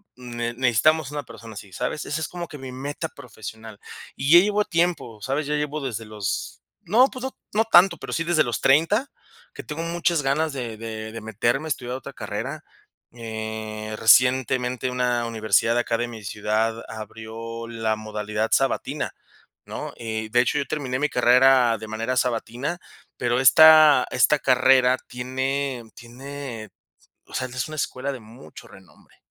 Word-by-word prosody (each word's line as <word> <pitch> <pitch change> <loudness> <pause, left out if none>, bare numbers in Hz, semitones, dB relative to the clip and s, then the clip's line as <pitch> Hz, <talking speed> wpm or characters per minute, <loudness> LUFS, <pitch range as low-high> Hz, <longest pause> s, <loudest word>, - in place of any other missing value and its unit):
ne 120 -1 -5
necesitamos 130 +5 +2
una 145 -1 -4
persona 115 0 -12
así", 95 0 -10
¿sabes? 125 +8 -3
Esa 155 +2 -3
es - - -2
como 175 -1 -6
que 150 - -10
mi 130 -1 -7
meta 145 +5 -5
profesional. 110 -4 -10 0.4
Y 140 +3 -1
ya 175 - +11
llevo 210 0 +1
tiempo, 165 -10 -1
¿sabes? 140 +6 -2
Ya 150 - 0
llevo 150 0 -2
desde 115 -4 -4
los 105 -2 -4 0.2
no, 235 +8 +5
pues 255 - -8
no 265 - -5 0.2
no 220 +2 +2
tanto, 180 -4 +6
pero - - -8
sí 165 - 0
desde 165 -2 +3
los 120 - -2
30, 165 - +3 0.4
que - - -8
tengo 155 +2 -5
muchas 170 -1 0
ganas 150 +3 0
de 120 -5 -5
de 110 -1 -6
de 115 - -6
meterme 120 +7 -1
a - - -6
estudiar 125 -3 -3
otra 135 +1 -8
carrera. 120 +8 -5 0.5
Eh, 110 -2 -6
recientemente 125 +1 +3
una 125 -1 0
universidad 110 0 +2
de 120 - +3
acá 115 - -1
de 120 +1 -2
mi 115 -3 -10
ciudad 110 +2 -1
abrió 115 +1 -7
la 115 -1 -1
modalidad 105 0 -3
sabatina, 135 +1 0 0.5
¿no? - - -6
Eh, 110 -2 -4
de 120 - +4
hecho, 125 +4 0
yo 140 - -1
terminé 135 -4 -2
mi 150 - +1
carrera 125 -1 +5
de 110 - -8
manera 115 +3 -2
sabatina, 125 +6 -2 0.4
pero 120 0 0
esta 155 0 +8
esta 145 +4 +3
carrera 130 -1 +4
tiene 130 +1 -3
tiene, 125 -2 -8 0.6
o - - -19
sea, 130 - -2
es 130 0 -3
una 155 - -7
escuela 140 -1 -3
de 130 - -8
mucho 115 +4 -14
renombre, 95 -2 -19
125 Hz, 170 wpm, -24 LUFS, 115-145 Hz, 0.6 s, ya